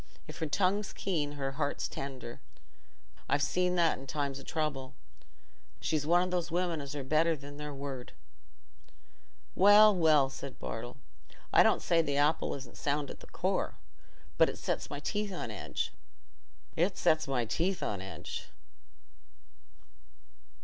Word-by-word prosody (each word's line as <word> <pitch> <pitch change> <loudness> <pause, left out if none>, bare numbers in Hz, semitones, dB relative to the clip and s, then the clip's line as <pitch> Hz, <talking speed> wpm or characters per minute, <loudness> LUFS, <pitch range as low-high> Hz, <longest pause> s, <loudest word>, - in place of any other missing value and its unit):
If - - -9
her 160 - -1
tongue's 195 +5 +1
keen, 155 -7 -1
her 135 -2 -3
heart's 145 +1 -1
tender: 130 -4 -7 0.9
I've 145 0 +2
seen 180 +1 +1
that 170 -2 +3
in 135 - -11
times 140 -1 -2
o' - - -10
trouble. 140 -4 -3 0.8
She's 155 -2 -1
one 175 +2 +5
o' 185 - -2
those 175 -2 0
women 170 -2 0
as 140 +1 -6
are 140 - -3
better 155 +4 +3
than 145 0 -10
their 150 0 -5
word." 135 -3 -6 1.4
"Well, 205 +2 +8
well," 155 -5 +5
said 135 -1 -8
Bartle, 120 +3 -6 0.6
"I - - +8
don't - - +4
say 170 -1 +4
th' 140 -3 -1
apple 150 +2 +2
isn't 135 -3 -10
sound 145 -1 -1
at - - -10
the - - -13
core; - - -1 0.6
but - - +6
it - - -6
sets - - -2
my 145 - -4
teeth 205 +6 -2
on 175 -11 -4
edge—it 65 - -5
sets 155 -2 +3
my 125 -3 0
teeth 175 - 0
on 100 -2 -2
edge." 90 -2 -6
145 Hz, 150 wpm, -31 LUFS, 135-170 Hz, 1.4 s, Well